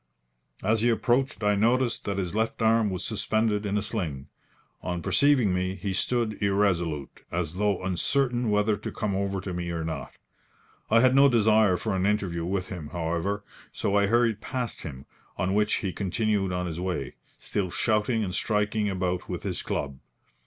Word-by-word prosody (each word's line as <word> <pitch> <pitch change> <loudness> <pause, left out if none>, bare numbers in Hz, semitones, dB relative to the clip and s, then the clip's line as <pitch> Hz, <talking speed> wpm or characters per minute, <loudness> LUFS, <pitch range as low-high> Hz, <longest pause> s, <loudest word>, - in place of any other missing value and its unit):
As 110 +2 +2
he 120 - +3
approached 120 +3 +1
I 105 0 +4
noticed 120 +4 +1
that 100 -1 -2
his 90 -2 -2
left 110 +1 -1
arm 110 -1 +4
was 95 -1 -3
suspended 110 -1 0
in 100 +1 0
a 105 - 0
sling. 85 - -3 0.5
On 90 -1 -3
perceiving 115 +1 +3
me 90 +1 -1
he 95 +1 -3
stood 110 +1 0
irresolute, 90 -8 0
as 85 -1 -2
though 100 -2 +1
uncertain 120 +6 +1
whether 105 +1 +2
to 105 - -6
come 105 -2 -2
over 100 0 -1
to 95 -1 -5
me 85 0 -3
or 85 -1 -2
not. 80 -1 -5 0.8
I 115 +1 +5
had 130 0 +5
no 140 +1 +7
desire 110 -5 +4
for 110 0 -2
an 95 +1 +1
interview 95 -5 0
with 95 0 -2
him, 85 -5 -6
however, 85 +5 -2 0.3
so 100 - -1
I 100 0 +4
hurried 115 -1 +2
past 125 +1 -4
him, 70 -3 -8 0.3
on 95 +1 0
which 105 +1 +2
he 95 -4 -2
continued 100 0 0
on 90 0 -1
his 85 -1 -4
way, 90 -8 -3 0.2
still 95 -3 -2
shouting 110 +4 +1
and 90 -3 -3
striking 105 +1 0
about 90 -2 -2
with - - -4
his - - -2
club. 70 -2 -3
100 Hz, 180 wpm, -27 LUFS, 90-110 Hz, 0.8 s, no